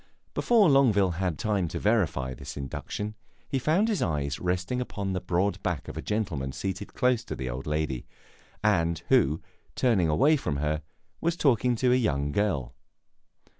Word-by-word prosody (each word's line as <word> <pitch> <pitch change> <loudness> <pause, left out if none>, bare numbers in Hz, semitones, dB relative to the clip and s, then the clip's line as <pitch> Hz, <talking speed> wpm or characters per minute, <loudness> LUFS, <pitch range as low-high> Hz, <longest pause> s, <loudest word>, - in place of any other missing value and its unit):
Before 225 -5 +4
Longueville 115 - +4
had 90 -5 -1
time 100 -5 0
to - - -4
verify 85 - +1
this 60 - -8
induction, 105 +9 -4 0.3
he 135 - -1
found 165 - +2
his 215 -4 0
eyes 75 -3 -1
resting 90 +7 -1
upon 100 -5 -3
the 90 - -2
broad 90 +2 0
back 90 -8 -2
of - - -7
a - - -4
gentleman 85 -12 -2
seated 95 +7 -4
close 125 -2 +2
to - - -5
the 65 -2 -4
old 65 +4 -6
lady, 75 -5 -2 0.6
and 85 -6 +2
who, 80 - +3 0.3
turning 105 -10 +2
away 140 - +4
from 75 - -2
her, 75 +1 -1 0.4
was 170 0 0
talking 125 -5 +3
to 125 +2 +3
a - - +5
young 75 - +1
girl. 75 -10 0
95 Hz, 170 wpm, -27 LUFS, 75-120 Hz, 0.6 s, a